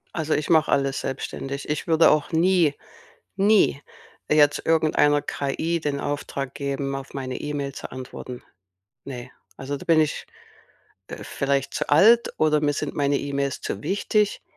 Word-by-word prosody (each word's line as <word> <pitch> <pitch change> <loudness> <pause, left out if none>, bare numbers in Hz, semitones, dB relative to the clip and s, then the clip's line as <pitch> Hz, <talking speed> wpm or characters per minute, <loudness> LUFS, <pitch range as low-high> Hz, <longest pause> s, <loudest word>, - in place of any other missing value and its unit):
Also, 160 -2 -1
ich 150 - -1
mache 160 -2 +4
alles 135 -1 +1
selbstständig. 135 +1 -5
Ich 150 +3 -3
würde 165 0 +5
auch 150 +2 +1
nie, 170 -2 +3 0.6
nie 200 -6 +3 0.5
jetzt 145 -1 +3
irgendeiner 155 -2 +3
KI 150 +4 -2
den 145 -2 -2
Auftrag 140 -2 -4
geben, 140 -1 -3
auf 135 0 -8
meine 130 -2 -5
E-Mail 145 -2 -4
zu - - -8
antworten. 130 -1 -8 0.6
Ne. 125 -2 -8 0.2
Also, 140 +2 -4
da - - -10
bin 165 -2 +4
ich, 155 -2 -1 0.8
äh, - - -8
vielleicht 140 -1 -1
zu - - -3
alt 220 +11 +5
oder 155 -1 +2
mir 145 -1 +1
sind 150 0 -4
meine 145 -1 +1
E-Mails 140 -1 -3
zu 100 - -4
wichtig. 205 +1 0
145 Hz, 150 wpm, -24 LUFS, 140-160 Hz, 0.8 s, würde